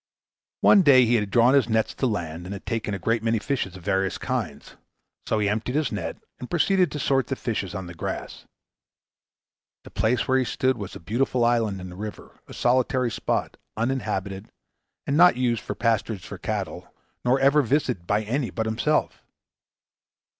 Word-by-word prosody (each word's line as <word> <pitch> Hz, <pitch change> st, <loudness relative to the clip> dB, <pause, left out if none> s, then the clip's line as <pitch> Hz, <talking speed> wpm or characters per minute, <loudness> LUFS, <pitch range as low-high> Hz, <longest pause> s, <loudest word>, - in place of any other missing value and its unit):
One 200 Hz, -, +7 dB
day 135 Hz, -6 st, +6 dB
he 120 Hz, -, +1 dB
had 105 Hz, -4 st, +1 dB
drawn 120 Hz, +4 st, +4 dB
his 135 Hz, -5 st, +3 dB
nets 110 Hz, 0 st, +1 dB
to 130 Hz, -, -1 dB
land, 85 Hz, -5 st, -4 dB
and 95 Hz, -, -5 dB
had 100 Hz, -, -9 dB
taken 110 Hz, -3 st, -2 dB
a -, -, -3 dB
great 115 Hz, +5 st, 0 dB
many 115 Hz, 0 st, +1 dB
fishes 110 Hz, -6 st, -2 dB
of 90 Hz, -, -11 dB
various 95 Hz, +1 st, 0 dB
kinds. -, -, -4 dB, 0.5 s
So 110 Hz, -, +1 dB
he 105 Hz, -1 st, +1 dB
emptied 110 Hz, +5 st, -1 dB
his 150 Hz, -3 st, 0 dB
net, 85 Hz, -6 st, -4 dB, 0.2 s
and 125 Hz, -, -7 dB
proceeded 180 Hz, +2 st, +2 dB
to 150 Hz, -, -4 dB
sort 135 Hz, -1 st, +1 dB
the 135 Hz, -, -2 dB
fishes 100 Hz, -8 st, -3 dB
on 95 Hz, -, -4 dB
the 85 Hz, -, -9 dB
grass. 80 Hz, -, -6 dB, 1.4 s
The -, -, -13 dB
place 115 Hz, +2 st, 0 dB
where 130 Hz, 0 st, +3 dB
he -, -, +2 dB
stood 130 Hz, +1 st, 0 dB
was 100 Hz, -4 st, -7 dB
a -, -, -8 dB
beautiful 120 Hz, +6 st, 0 dB
island 115 Hz, -5 st, +1 dB
in 90 Hz, 0 st, -8 dB
the -, -, -10 dB
river, 105 Hz, +2 st, -8 dB
a -, -, -11 dB
solitary 125 Hz, 0 st, +1 dB
spot, -, -, -2 dB, 0.2 s
uninhabited, 105 Hz, -5 st, -2 dB, 0.6 s
and 140 Hz, -, 0 dB
not 175 Hz, -2 st, +6 dB
used 120 Hz, -3 st, 0 dB
for 105 Hz, -, -5 dB
pasturage 110 Hz, -3 st, -1 dB
of -, -, -8 dB
cattle, -, -, -4 dB, 0.3 s
nor 125 Hz, +2 st, +3 dB
ever 140 Hz, +2 st, +5 dB
visited 125 Hz, -, -1 dB
by 105 Hz, +1 st, +1 dB
any 125 Hz, +4 st, -1 dB
but 110 Hz, -, -3 dB
himself. 115 Hz, +8 st, 0 dB
115 Hz, 185 wpm, -25 LUFS, 100-130 Hz, 1.4 s, One